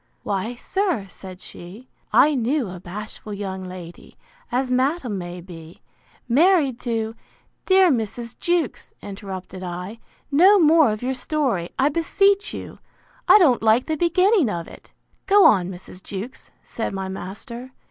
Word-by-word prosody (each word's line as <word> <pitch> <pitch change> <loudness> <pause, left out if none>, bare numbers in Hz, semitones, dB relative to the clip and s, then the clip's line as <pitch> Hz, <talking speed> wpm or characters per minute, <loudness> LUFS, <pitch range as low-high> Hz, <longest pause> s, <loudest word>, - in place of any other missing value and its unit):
Why, 205 +4 -2
sir, 360 - -1
said 185 0 -11
she, 200 +9 -11 0.2
I 300 - +5
knew 250 -3 0
a 180 - -8
bashful 210 +3 -8
young 190 -2 -5
lady, 180 -2 -10 0.3
as 250 +1 0
madam 255 - 0
may 175 0 -7
be, 165 -2 -12 0.4
married 285 -1 +3
to—Dear 235 - 0
Mrs. 230 -1 -3
Jewkes, 345 -7 -1
interrupted 195 -2 -7
I, 180 +5 -6 0.3
no 370 +8 +6
more 320 - +5
of 215 +2 -5
your 260 +1 0
story, 255 - -1
I 270 +2 +3
beseech 395 +6 +2
you; - - -8 0.5
I - - +9
don't 295 - +4
like 225 +3 +3
the 315 - -1
beginning 360 - +3
of 170 -4 -4
it. - - -15 0.4
Go 400 +1 +6
on, 185 -3 +5
Mrs. 185 0 -10
Jewkes, 205 +7 -7
said 225 - -4
my 190 -1 -3
master. 235 +7 -7
230 Hz, 140 wpm, -22 LUFS, 190-305 Hz, 0.5 s, I